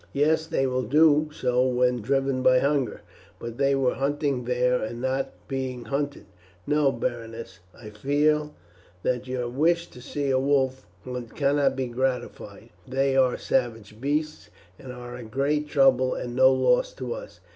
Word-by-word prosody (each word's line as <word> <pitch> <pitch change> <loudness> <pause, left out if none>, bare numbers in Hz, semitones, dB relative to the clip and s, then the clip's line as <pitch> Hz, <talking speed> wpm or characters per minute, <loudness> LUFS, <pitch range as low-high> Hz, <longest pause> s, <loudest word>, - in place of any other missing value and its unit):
"Yes, 155 +3 +2
they 160 -4 0
will 130 -1 0
do 150 +3 +4
so 125 -3 +1
when 125 -1 +1
driven 135 +2 0
by 130 0 +5
hunger; 140 -4 0 0.4
but 120 +2 -8
they 140 0 +3
were 135 -2 +1
hunting 140 -2 -1
then 125 0 +1
and 115 +2 -5
not 130 +2 -1 0.2
being 130 -2 -4
hunted. 140 -5 -3 0.4
No, 150 -2 +2
Berenice, 115 -4 -5 0.2
I 110 -2 -10
fear 150 +6 +1 0.5
that 125 0 -1
your 125 -1 -2
wish 165 +7 +1
to 125 - -12
see 140 +2 -2
a 130 - +3
wolf 130 -1 0 0.2
hunt 125 -2 -6
cannot 140 -1 +2
be 130 -1 -1
gratified; 125 +1 -4 0.2
they 135 +1 +1
are 130 -2 +3
savage 115 -4 -2
beasts, 150 +2 -2 0.3
and 130 - -9
are 125 0 -8
great 140 +6 -1
trouble 130 -3 +3
and 120 -1 -5
no 130 +1 +6
loss - - +2
to - - -5
us. - - -10
130 Hz, 155 wpm, -25 LUFS, 125-145 Hz, 0.5 s, no